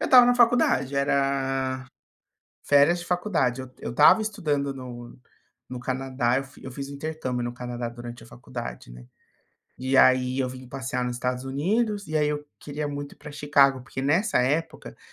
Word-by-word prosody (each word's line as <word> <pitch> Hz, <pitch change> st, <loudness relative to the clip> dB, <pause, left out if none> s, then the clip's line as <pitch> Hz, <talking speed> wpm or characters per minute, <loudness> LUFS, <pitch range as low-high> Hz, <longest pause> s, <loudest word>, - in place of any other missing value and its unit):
Eu -, -, -1 dB
estava 250 Hz, -2 st, +8 dB
na 245 Hz, -, +4 dB
faculdade, 235 Hz, -, +3 dB
era 135 Hz, -1 st, 0 dB, 0.8 s
férias 145 Hz, +5 st, +4 dB
de 175 Hz, -, -8 dB
faculdade. 175 Hz, -, 0 dB
Eu 130 Hz, -1 st, -11 dB
eu -, -, -5 dB
estava 150 Hz, -, +6 dB
estudando 145 Hz, -10 st, -1 dB
no 120 Hz, -2 st, -9 dB, 0.5 s
no 125 Hz, -, -6 dB
Canadá. 130 Hz, -1 st, -1 dB
Eu -, -, -5 dB, 0.2 s
eu 130 Hz, -, -7 dB
fiz 140 Hz, +2 st, -6 dB
intercâmbio 140 Hz, -4 st, -4 dB
no 120 Hz, 0 st, -3 dB
Canadá 120 Hz, -1 st, -5 dB
durante 120 Hz, 0 st, -9 dB
a -, -, -15 dB
faculdade, 60 Hz, 0 st, -8 dB
né. -, -, -12 dB, 0.7 s
E 130 Hz, +1 st, 0 dB
aí 130 Hz, 0 st, +4 dB
eu 130 Hz, -1 st, 0 dB
vim 130 Hz, 0 st, -10 dB
passear 130 Hz, -1 st, -3 dB
nos 125 Hz, 0 st, -3 dB
Estados 125 Hz, +1 st, -2 dB
Unidos, 205 Hz, -, -1 dB
e 155 Hz, -, 0 dB
aí 150 Hz, -1 st, +2 dB
eu 150 Hz, 0 st, -3 dB, 0.2 s
queria 150 Hz, +1 st, -4 dB
muito 145 Hz, 0 st, -6 dB
ir -, -, -28 dB
para 150 Hz, 0 st, -10 dB
Chicago 140 Hz, -2 st, +3 dB
porque, 130 Hz, +1 st, -6 dB
nessa 170 Hz, +11 st, +2 dB
época, 150 Hz, +6 st, -2 dB
135 Hz, 175 wpm, -25 LUFS, 125-150 Hz, 0.8 s, estava